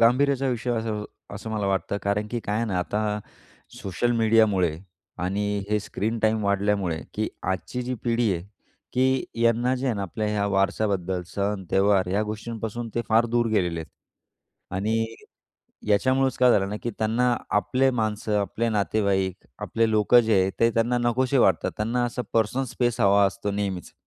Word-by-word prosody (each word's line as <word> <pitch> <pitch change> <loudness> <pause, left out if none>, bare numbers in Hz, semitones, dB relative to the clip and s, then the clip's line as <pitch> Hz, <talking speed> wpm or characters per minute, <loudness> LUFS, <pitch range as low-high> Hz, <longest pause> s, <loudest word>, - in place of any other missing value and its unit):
गांभीर्याचा 135 +3 +3
विषय 125 0 -2
असं 110 -2 -2 0.3
असं 105 +3 -7
मला 105 -2 -1
वाटतं. 95 +1 -1
कारण 100 +1 0
की 120 +1 -3
काय 105 -1 -2
आहे 115 - 0
ना, 95 -5 -1
आता 105 +3 -1 0.6
सोशल 100 +6 -1
मीडियामुळे 110 -7 +3 0.5
आणि 105 +2 -1
हे 105 - +3
स्क्रीन 110 +2 -3
टाईम 110 -1 +1
वाढल्यामुळे, 100 -4 0
की 110 +1 -1 0.2
आजची 125 +7 -4
जी 125 +1 -3
पिढी 115 -3 +2
आहे, 85 - -4 0.5
की 130 +1 +2 0.2
यांना 120 +2 +3
जे 130 +1 -3
आहे 125 - +1
ना, 100 - -3
आपल्या 100 +3 -3
ह्या 105 -1 0
वारस्याबद्दल, 95 -2 0
सण, 100 -1 -1
त्यौहार 95 -1 +3
या 100 +2 +2
गोष्टींपासून 110 +2 -5
ते 120 - 0
फार 115 +1 +4
दूर 120 0 +1
गेलेले 90 -6 0
आहेत 80 - -11 0.8
आणि 110 +4 0 0.8
याच्यामुळेच 130 +5 +2
काय 125 -1 +6
झालं 95 -4 +3
ना, 105 - -3
की 120 - -2
त्यांना 120 +3 +2 0.2
आपले 130 +5 +2
माणसं, 110 -3 -1
आपले 115 +3 -1
नातेवाईक, 100 -3 0
आपले 115 0 0
लोकं 110 +3 +5
जे 110 -4 +3
आहे 95 +1 +1
ते 115 0 +5
त्यांना 120 +2 +2
नकोशे 125 +3 +1
वाटतात. - - +3
त्यांना 115 +3 0
असा 120 +1 -3
पर्सनल 115 +4 +1
स्पेस 120 -1 0
हवा 100 -1 +5
असतो 105 +1 -3
नेहमीच. 100 -3 -3
110 Hz, 165 wpm, -25 LUFS, 100-120 Hz, 0.8 s, काय